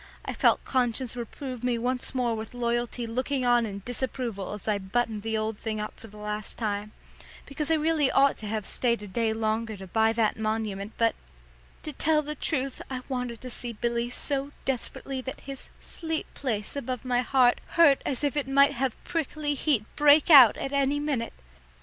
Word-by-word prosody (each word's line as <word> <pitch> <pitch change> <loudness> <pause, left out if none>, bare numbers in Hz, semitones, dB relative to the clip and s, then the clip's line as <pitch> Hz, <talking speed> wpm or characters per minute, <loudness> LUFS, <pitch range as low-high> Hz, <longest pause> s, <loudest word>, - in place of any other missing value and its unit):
I - - -3
felt - - +3
conscience 250 -1 0
reprove 250 +1 -6
me 245 -1 +1
once 250 +3 -1
more 245 -2 +1
with 220 +2 -7
loyalty 240 0 -1
looking 255 +3 -1
on 240 -2 +4
in 200 -1 -7
disapproval 245 -5 -3
as 210 - -8
I 210 -2 +1
buttoned 215 +2 -1
the 220 +1 -1
old 215 -1 -2
thing 220 -1 -3
up 210 - -6
for 225 - -11
the 210 0 -14
last 210 0 -5
time, 210 -1 -2 0.5
because 285 +2 -3
I 325 - +5
really 310 -2 +2
ought 275 0 +4
to 215 - -7
have 215 -1 -2
stayed 235 -4 0
a - - -7
day 225 +3 0
longer 220 0 -1
to 190 - -8
buy 220 +4 +2
that 225 -1 +1
monument, 215 -2 -2
but 230 -1 +3 0.7
to 305 - -4
tell 305 +2 +2
the 300 +1 -3
truth 275 -3 -2
I 255 -1 -4
wanted 250 -3 -3
to 255 - -7
see 240 0 -3
Billy 235 +1 -1
so 275 +2 -2
desperately 265 +1 -3
that 260 +1 -7
his 275 -1 -8
"sleep 320 -2 -4
place" 220 -6 -3
above 255 -2 -4
my 245 -1 +2
heart 250 -1 +3 0.2
hurt 305 -5 +6
as 275 +1 -2
if 290 -1 +1
it 290 -2 0
might 280 +1 +5
have 260 -2 -2
prickly 305 -3 -2
heat 275 -6 +1
break 295 +2 +6
out 260 -7 +10
at 270 - -4
any 280 +1 +2
minute. 280 -6 -2
245 Hz, 190 wpm, -27 LUFS, 220-275 Hz, 0.7 s, out